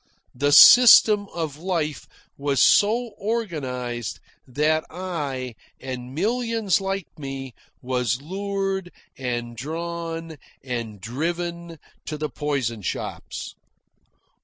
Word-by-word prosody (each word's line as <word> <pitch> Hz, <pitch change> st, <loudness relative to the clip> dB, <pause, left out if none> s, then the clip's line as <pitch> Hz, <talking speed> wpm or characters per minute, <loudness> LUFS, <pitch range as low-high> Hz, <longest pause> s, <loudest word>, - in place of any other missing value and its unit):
The 145 Hz, +3 st, +1 dB
system 215 Hz, +1 st, +9 dB
of 160 Hz, -4 st, -4 dB
life 165 Hz, -4 st, -2 dB, 0.3 s
was 140 Hz, -1 st, -1 dB
so 225 Hz, -, +4 dB
organised 130 Hz, -, -3 dB, 0.3 s
that 150 Hz, +4 st, +1 dB
I 145 Hz, -9 st, -4 dB, 0.3 s
(and 130 Hz, 0 st, -7 dB
millions 225 Hz, 0 st, 0 dB
like 195 Hz, -1 st, -2 dB
me) 135 Hz, -2 st, -6 dB, 0.3 s
was 125 Hz, -2 st, 0 dB
lured 195 Hz, +2 st, -3 dB, 0.2 s
and 120 Hz, -2 st, -4 dB
drawn 165 Hz, +3 st, -5 dB, 0.3 s
and 115 Hz, -5 st, -5 dB
driven 170 Hz, -, -4 dB, 0.3 s
to 155 Hz, -, -4 dB
the 150 Hz, 0 st, -3 dB
poison 130 Hz, -5 st, -2 dB
shops. 90 Hz, -, -5 dB
155 Hz, 95 wpm, -24 LUFS, 130-185 Hz, 0.3 s, system